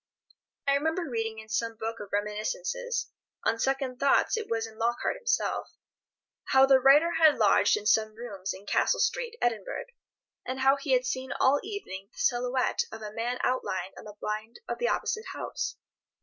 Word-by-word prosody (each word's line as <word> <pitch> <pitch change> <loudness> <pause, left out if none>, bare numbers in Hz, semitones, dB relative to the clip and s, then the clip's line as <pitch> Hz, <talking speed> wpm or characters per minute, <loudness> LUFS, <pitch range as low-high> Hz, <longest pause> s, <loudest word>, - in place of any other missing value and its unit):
I 280 - +4
remember 320 +4 0
reading 225 -3 -2
in 220 0 -9
some 230 +1 -1
book 225 +1 -4
of 205 -2 -8
reminiscences—on 230 - -3
second 265 0 -1
thoughts 275 - +3
it 445 -1 -4
was 225 0 0
in 220 -1 -12
Lockhart 235 - 0
himself—how 470 - -1
the 270 -1 +6
writer 285 +6 +6
had 315 -2 +6
lodged - - +4
in 425 - -7
some 215 - +3
rooms 200 -5 -5
in 195 +2 -9
Castle - - +2
Street, 475 -2 0
Edinburgh, 225 -5 -1 0.6
and 260 +1 -4
how 270 +1 +5
he 275 -1 -1
had 255 0 +3
seen 260 +1 -3
all 275 +2 +4
evening 200 - -7
the - - -25
silhouette 250 -7 +1
of 220 0 -8
a 210 0 -6
man 240 +3 -2
outlined 190 -7 -1
on - - -11
the 210 -1 -10
blind 215 +2 -4
of - - -4
the 485 - +1
opposite 435 0 -1
house. - - -4
250 Hz, 170 wpm, -28 LUFS, 220-285 Hz, 0.6 s, the